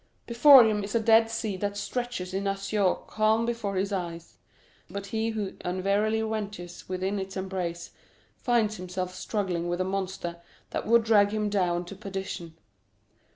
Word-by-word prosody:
Before 245 +1 +8
him 210 -2 +1
is 200 +3 -5
a - - +4
dead 225 0 +5
sea 225 -3 -3
that 205 +1 -3
stretches 235 -4 -4
in 195 +1 -1
azure 195 0 +1
calm 220 +1 +2
before 220 -5 -2
the 200 +1 -1
eye; 170 -2 -4 0.7
but 200 +2 -5
he 220 +3 -1
who 215 -3 -3
unwarily 200 +4 +1
ventures 205 -6 -5
within 190 +2 -1
its 190 0 -5
embrace 180 -3 -4 0.4
finds 230 -4 +1
himself 185 0 -4
struggling 185 -2 -2
with 175 +1 -1
a - - +2
monster 190 -2 -3 0.3
that - - -3
would 235 +1 +5
drag 210 -2 +5
him 210 0 -1
down 180 -3 +1
to 200 - -9
perdition. 190 -4 -6
200 Hz, 155 wpm, -27 LUFS, 185-220 Hz, 0.7 s, Before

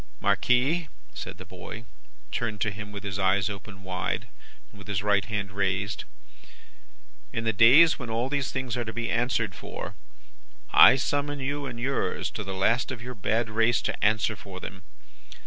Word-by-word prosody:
"'Marquis,' 140 +7 +2 0.3
said - - -7
the - - -10
boy, 100 +5 -9 0.5
turned 110 -3 -2
to 105 - +1
him 105 0 -8
with 100 -1 -7
his 100 -1 -4
eyes 95 +1 +2
opened 100 -1 -9
wide, 95 -1 -3 0.4
and 100 -1 -13
his 100 -1 -1
right 100 -1 +2
hand 100 -3 -3
raised, 100 +1 -1 1.3
'in 115 - -3
the 110 0 +1
days 130 +10 +7
when 125 -3 -6
all 115 +3 0
these 140 -1 -1
things 130 -3 -2
are 120 - -1
to 110 - -5
be 120 +1 -2
answered 115 -3 0
for, - - -7 0.8
I - - +9
summon 145 +2 -1
you 140 +1 -2
and 120 -2 -6
yours, 135 +3 -1
to 105 - -5
the 95 -1 -5
last 115 +7 +2
of 120 -3 -6
your 125 +1 -6
bad 115 +2 0
race, 115 +2 +3
to - - -2
answer 110 +1 +2
for 95 -1 -9
them. 95 0 -8
110 Hz, 175 wpm, -27 LUFS, 100-125 Hz, 1.3 s, I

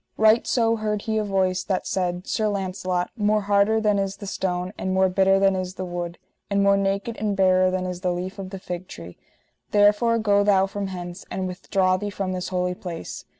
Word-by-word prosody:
Right 220 +1 +4
so 230 -2 +2
heard 210 -1 -2
he 220 -1 0
a - - 0
voice 190 -2 0
that 190 -2 -2
said: 180 -1 -2
Sir 215 -2 0
Launcelot, 185 -3 -2
more 210 -1 +2
harder 205 +2 +3
than 210 -2 +2
is 195 0 -2
the 200 - -8
stone, 185 -1 -2
and 190 0 -2
more 190 0 +4
bitter 195 +1 +3
than 195 0 +3
is 185 0 -4
the 185 - -4
wood, 175 -1 -5 0.3
and 200 0 +2
more 200 0 +5
naked 200 +4 -1
and 210 -2 -1
barer 185 -1 +4
than 185 0 -2
is 180 -1 -5
the 180 -2 0
leaf 185 +3 -4
of 190 -1 -6
the 195 - -6
fig 180 -1 -6
tree; 85 +1 -10 0.5
therefore 210 +3 +4
go 205 -2 +3
thou 195 -2 +4
from 200 0 -4
hence, 175 -2 -7
and 190 - -3
withdraw 185 0 0
thee 205 +1 -4
from 195 -2 -3
this 185 0 -3
holy 180 -1 -1
place. 175 -2 -7
195 Hz, 215 wpm, -24 LUFS, 185-205 Hz, 0.5 s, more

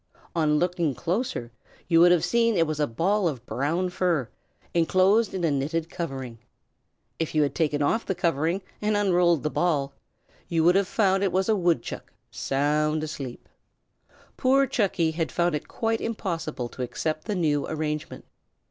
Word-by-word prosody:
On 155 -2 +2
looking 170 -4 0
closer, 175 - -2 0.4
you 165 -1 +4
would 175 +1 +7
have 175 -1 +3
seen 230 +3 +2
that 170 - +3
it - - +4
was 155 -1 -3
a 150 - +2
ball 185 - +1
of 130 -7 -4
brown 165 +9 -1
fur, 175 -9 0 0.4
enclosed 185 +6 +3
in 185 - -3
a 165 - +2
knitted 155 +4 -2
covering. 135 -9 -5 0.8
If 160 -1 -2
you 155 - +4
had 145 - -1
taken 150 -3 0
off 225 +11 0
the 190 - -1
covering 165 +4 0 0.2
and 210 0 +1
unrolled 175 -5 +3
the 150 - -1
ball, 145 -6 0 0.5
you 165 -1 +1
would 175 +2 +6
have 195 0 +2
found 195 -2 +2
that - - +2
it 190 - 0
was 190 +3 0
a 220 - +4
woodchuck, 170 - -1 0.2
sound 150 +3 0
asleep. 140 -5 -6 0.9
Poor 270 +1 +4
Chucky 190 -10 0
had 160 0 -2
found 175 -1 +1
it 150 - -3
quite 225 0 -1
impossible 165 - -3
to 130 - -8
accept 155 +5 -3
the 210 - -2
new 150 -5 +1
arrangement. 155 -1 -4
165 Hz, 175 wpm, -26 LUFS, 150-185 Hz, 0.9 s, would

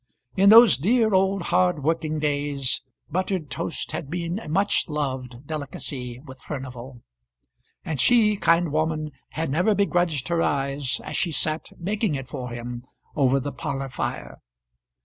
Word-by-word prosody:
In 195 +1 +5
those 225 - +9
dear 220 - +3
old 190 0 +2
hard 180 -4 +2
working 155 0 0
days, 145 -3 -1 0.3
buttered 185 -2 -2
toast - - -2
had 140 - -5
been 170 +3 -3
a 190 - -9
much 195 +2 +2
loved 130 -4 -4
delicacy 135 -4 -5
with 130 -2 -13
Furnival; 130 -3 -7 0.8
and 150 -6 0
she, 220 -4 +5
kind 170 -4 +2
woman, 155 0 -1 0.2
had 160 -2 -2
never 180 +8 +2
begrudged 175 -7 +1
her 170 -1 +1
eyes, 140 -2 -1
as - - -6
she 175 - +1
sat 155 +1 -1
making 200 -1 -1
it 135 -2 -5
for 125 -1 -6
him 120 0 -6 0.3
over 135 -2 +3
the 140 +2 -4
parlour 135 -3 -4
fire. 125 - -5
155 Hz, 150 wpm, -24 LUFS, 135-180 Hz, 0.8 s, those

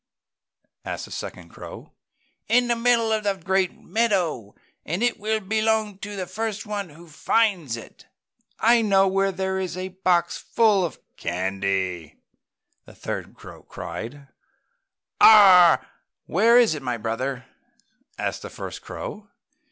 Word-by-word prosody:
asked - - -5
the - - -15
second - - -7
crow. - - -11 0.5
"In 245 +2 +3
the 235 - +3
middle 230 -1 +2
of 215 -1 0
the 200 -1 0
great 190 0 -1
meadow, 180 - -1 0.3
and 175 +9 -3
it 240 -2 0
will 215 +1 -1
belong 215 0 0
to 205 +1 -7
the 200 +3 -4
one 205 -3 -4
who 165 +3 -15
finds 165 - 0
it 115 - -13
first!" - - -32
"I 235 +1 +4
know 195 -3 +3
where 195 +1 +1
there 190 0 -2
is 185 -1 -4
a 185 +1 -4
box 185 -2 0
full 215 -4 +2
of 170 - -4 0.2
candy!" 95 -2 -2 0.7
the - - -16
third - - -6
crow - - -13
cried. 140 +5 -8 0.9
"Ahhhh! 190 -5 +8 0.4
Where 225 +7 +4
is 235 -8 +5
it, 150 - -6
my 125 -2 -3
brother?" 125 +3 -3 0.7
asked - - -3
the - - -8
first - - -8
crow. 210 0 -8
190 Hz, 140 wpm, -24 LUFS, 155-215 Hz, 0.9 s, Ahhhh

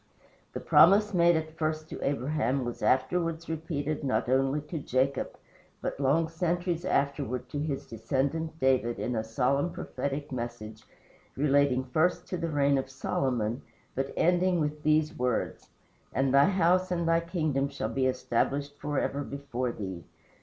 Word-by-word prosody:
The - - -3
promise 205 +4 +5
made 170 -1 +5
at 160 0 -3
first 155 0 -1
to - - -7
Abraham 135 -2 0
was 120 - -5
afterwards 165 +5 +1
repeated 155 -2 -3
not 130 -2 0
only 135 +3 +2
to 150 +2 -5
Jacob, 135 0 0 0.4
but - - -4
long 145 +4 +2
centuries 175 +1 -1
afterward 140 -5 -1
to 145 - -4
his 145 -2 -3
descendant, 140 +8 -2
David, 130 -3 +2
in 125 - -2
a 110 - 0
solemn, 135 +8 0
prophetic 140 -2 -4
message, 120 -3 -6 0.5
relating 140 -2 +3
first 155 +8 +1
to 180 - -2
the 165 -1 -2
reign 140 -2 +2
of 135 - -5
Solomon, 125 -3 -1 0.3
but 135 +1 -2
ending 180 +1 +3
with 150 -1 -2
these 155 0 +2
words: 125 -2 -2 0.5
"And 135 0 +2
thy 140 0 +7
house 185 -1 +3
and 170 -2 -1
thy 165 0 +4
kingdom 155 -5 -1
shall 140 -6 -3
be 130 +1 +2
established 140 +2 -1
forever 145 -1 -1
before 135 -3 -3
thee. 95 -6 -6
140 Hz, 150 wpm, -29 LUFS, 130-160 Hz, 0.5 s, thy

